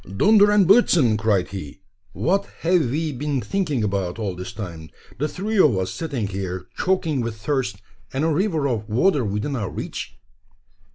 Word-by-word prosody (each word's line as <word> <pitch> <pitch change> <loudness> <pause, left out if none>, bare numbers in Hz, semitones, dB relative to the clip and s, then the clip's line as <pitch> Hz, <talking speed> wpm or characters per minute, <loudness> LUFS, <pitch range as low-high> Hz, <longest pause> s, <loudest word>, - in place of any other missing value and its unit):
"Dunder 205 - +6
und 205 -2 +5
blitzen!" 175 - +5
cried 105 -4 +1
he; 95 -2 -8 0.3
"what 195 +3 0
have 165 -6 +2
we 155 +4 -1
been 145 +1 -2
thinking 145 - -1
about 100 -3 -1
all 105 -4 -2
this 90 +5 -6
time? 85 -7 -7 0.3
The 150 - +1
three 205 +6 -2
of 140 - +5
us 95 0 -1
sitting 135 - -3
here 95 -2 -4
choking 170 -7 0
with 115 -2 -4
thirst, 110 -5 -2 0.3
and 135 +3 -1
a 165 - +2
river 160 -3 +1
of 110 -5 -3
water 140 - +2
within 105 +7 -2
our 105 -7 -2
reach!" - - -6
125 Hz, 170 wpm, -23 LUFS, 100-165 Hz, 0.3 s, Dunder